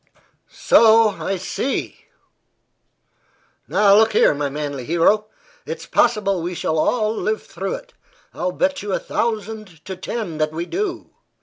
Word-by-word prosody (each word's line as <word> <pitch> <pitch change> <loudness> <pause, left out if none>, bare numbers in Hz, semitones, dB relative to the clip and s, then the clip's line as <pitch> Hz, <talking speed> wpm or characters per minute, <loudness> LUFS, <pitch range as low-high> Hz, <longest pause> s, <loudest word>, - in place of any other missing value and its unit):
"So 225 -1 +5
I 195 -1 -3
see. 220 +8 -3 1.6
Now, 200 -1 +4
look 220 +1 +4
here, - - +5
my 145 0 -2
manly 145 -2 -4
hero. 175 - +2 0.4
It's - - -5
possible 205 -6 +1
we 175 +2 -4
shall 160 -1 -1
all 215 +5 +1
live 215 0 -2
through - - -4
it; - - -12 0.4
I'll 180 +1 -2
bet 280 +8 0
you 205 -1 -4
a - - +1
thousand 215 -7 -4
to 190 - -5
ten 185 -3 -5
that 155 0 0
we 170 +2 -3
do. 375 - -4
205 Hz, 140 wpm, -21 LUFS, 170-225 Hz, 1.6 s, So